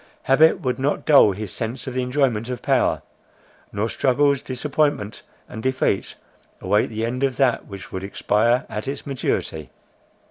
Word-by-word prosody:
Habit 155 Hz, +4 st, +4 dB
would 130 Hz, 0 st, -2 dB
not 140 Hz, +3 st, -1 dB
dull 140 Hz, -8 st, +6 dB
his 105 Hz, 0 st, -6 dB
sense 120 Hz, +2 st, -4 dB
of 130 Hz, -, -5 dB
the 130 Hz, -, -1 dB
enjoyment 125 Hz, -3 st, 0 dB
of 125 Hz, -1 st, -5 dB
power; -, -, +1 dB, 0.7 s
nor 105 Hz, +2 st, -1 dB
struggles, 140 Hz, +5 st, +2 dB
disappointment 135 Hz, -4 st, -1 dB, 0.3 s
and 110 Hz, -, -8 dB
defeat 130 Hz, -6 st, 0 dB, 0.4 s
await 105 Hz, +1 st, +1 dB
the 110 Hz, 0 st, -3 dB
end 125 Hz, +3 st, -3 dB
of 130 Hz, -2 st, 0 dB
that 135 Hz, -3 st, +1 dB
which 100 Hz, -1 st, -10 dB
would 95 Hz, -, -5 dB
expire 110 Hz, +5 st, +1 dB
at 105 Hz, +4 st, -5 dB
its 140 Hz, +1 st, -5 dB
maturity. 80 Hz, -, -3 dB
125 Hz, 155 wpm, -22 LUFS, 105-135 Hz, 0.7 s, dull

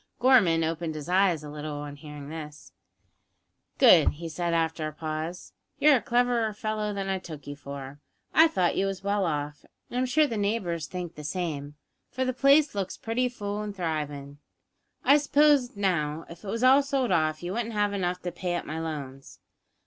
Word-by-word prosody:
Gorman 215 Hz, -11 st, +5 dB
opened 160 Hz, 0 st, -2 dB
his 150 Hz, 0 st, -6 dB
eyes 180 Hz, -3 st, +2 dB
a 150 Hz, -, -8 dB
little 150 Hz, 0 st, -5 dB
on 145 Hz, 0 st, -6 dB
hearing 145 Hz, -1 st, -10 dB
this. 150 Hz, -2 st, -9 dB, 1.1 s
"Good," -, -, +6 dB
he 165 Hz, +2 st, -7 dB
said, 170 Hz, +2 st, -2 dB
after 160 Hz, -1 st, 0 dB
a -, -, -5 dB
pause; 155 Hz, +3 st, -5 dB, 0.2 s
"you're 295 Hz, -2 st, +6 dB
a -, -, -4 dB
cleverer 240 Hz, -2 st, +1 dB
fellow 215 Hz, -1 st, -2 dB
than 195 Hz, -1 st, -3 dB
I 190 Hz, -1 st, -1 dB
took 155 Hz, -6 st, -10 dB
you 145 Hz, -, -6 dB
for. 140 Hz, -1 st, -8 dB, 0.3 s
I 320 Hz, +1 st, +7 dB
thought 185 Hz, -, +1 dB
you 195 Hz, -, +1 dB
was 195 Hz, -1 st, -5 dB
well 200 Hz, -2 st, +1 dB
off, 145 Hz, -1 st, -3 dB, 0.3 s
and 245 Hz, -, -1 dB
I'm 255 Hz, -, +1 dB
sure 305 Hz, +4 st, +4 dB
the 230 Hz, -6 st, -3 dB
neighbours 195 Hz, -7 st, -1 dB
think 175 Hz, +1 st, -6 dB
the 150 Hz, -, -10 dB
same, 150 Hz, -3 st, -4 dB, 0.3 s
for 260 Hz, +1 st, -2 dB
the 255 Hz, -, 0 dB
place 280 Hz, +3 st, +4 dB
looks 200 Hz, -2 st, -3 dB
pretty 245 Hz, +3 st, -1 dB
full 205 Hz, -3 st, -4 dB
an' 210 Hz, -1 st, -5 dB
thrivin'. 150 Hz, -5 st, -4 dB, 0.7 s
I 285 Hz, -, +7 dB
suppose, 290 Hz, -4 st, +3 dB
now, 165 Hz, -6 st, -1 dB
if 170 Hz, +3 st, -12 dB
it -, -, -9 dB
was 230 Hz, +4 st, -2 dB
all 265 Hz, +2 st, +7 dB
sold 270 Hz, -4 st, -1 dB
off 155 Hz, -2 st, +1 dB
you 175 Hz, +2 st, -3 dB
wouldn't 230 Hz, +1 st, -3 dB
have 205 Hz, -1 st, +1 dB
enough 180 Hz, -2 st, -2 dB
to 180 Hz, -, -3 dB
pay 175 Hz, 0 st, -3 dB
up 175 Hz, -, -3 dB
my 155 Hz, +1 st, -4 dB
loans?" 140 Hz, -4 st, -6 dB
180 Hz, 195 wpm, -27 LUFS, 155-220 Hz, 1.1 s, I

